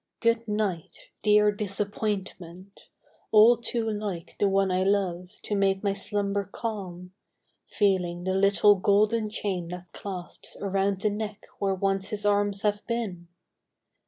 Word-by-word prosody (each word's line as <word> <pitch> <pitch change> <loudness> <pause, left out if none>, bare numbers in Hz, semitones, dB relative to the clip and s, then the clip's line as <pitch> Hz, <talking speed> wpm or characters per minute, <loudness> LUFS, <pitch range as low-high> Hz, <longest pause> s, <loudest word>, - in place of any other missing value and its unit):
Good 230 0 +1
night, 210 -6 -3
dear 210 0 +5
Disappointment! 200 -2 -4 0.4
all 220 +3 +7
too 230 0 -2
like 205 -6 -4
The 200 - +3
one 195 -1 +2
I 185 0 +1
love 190 -2 0
to - - -3
make 195 0 +1
my 200 -1 +1
slumber 200 0 -1
calm, 190 -3 -6 0.5
Feeling 180 -4 0
the 190 0 -1
little 200 +2 +5
golden 210 +3 +2
chain 190 -5 -3
that 180 0 -8
clasps 185 -3 -7
Around 195 0 0
the 210 - +1
neck 210 0 -5
where 195 -1 +1
once 195 +1 -1
his 210 -1 -2
arms 205 -1 +1
have 205 -1 0
been 210 -8 -3
200 Hz, 135 wpm, -27 LUFS, 190-210 Hz, 0.5 s, all